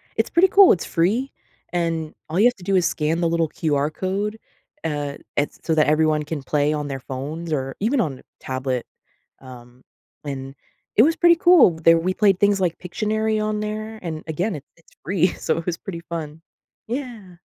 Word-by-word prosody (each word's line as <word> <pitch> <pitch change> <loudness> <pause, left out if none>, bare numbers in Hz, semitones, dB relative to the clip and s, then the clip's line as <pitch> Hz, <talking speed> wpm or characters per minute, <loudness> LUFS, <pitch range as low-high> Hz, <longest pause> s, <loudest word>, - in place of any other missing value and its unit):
It's - - 0
pretty 360 +2 +5
cool, 395 -1 +7
it's 175 - +1
free, 215 +11 0 0.4
and 165 -3 -2 0.2
all 165 +4 -1
you 215 - +5
have 245 - +1
to 190 - -15
do 195 +1 0
is 180 -2 +3
scan 160 +2 -1
the 170 - +2
little 165 -1 +1
QR 145 -2 0
code, 200 +5 -2 0.4
uh, 145 -3 -3 0.2
at 145 - -2
so 160 - +1
that 155 - +3
everyone 155 0 +2
can 150 0 -5
play 145 +2 +1
on 150 -1 -3
their 135 -1 -4
phones 145 +6 -6
or 135 -2 -2
even 240 +6 +1
on 140 - -3 0.2
tablet, 130 -2 -3 0.6
um, 125 -1 -13 0.4
and 135 -1 -6 0.4
it 220 - +8
was 315 +5 +3
pretty 345 -1 +5
cool. 345 - +6
They 165 +1 +6
we 170 +3 +1
played 195 -3 +3
things 200 -1 +3
like 175 -3 0
Pictionary 215 +4 -1
on 215 0 -1
there. 215 +1 -5
And, 160 -3 -5
again, 170 +5 -2
it's 145 0 -11
it's 165 - -26
free, 185 -1 +2
so - - -2
it 165 - -5
was 170 -2 -2
pretty 180 -5 -7
fun. 160 -1 -5 0.5
Yeah. 230 -8 -6
170 Hz, 190 wpm, -22 LUFS, 150-210 Hz, 0.6 s, it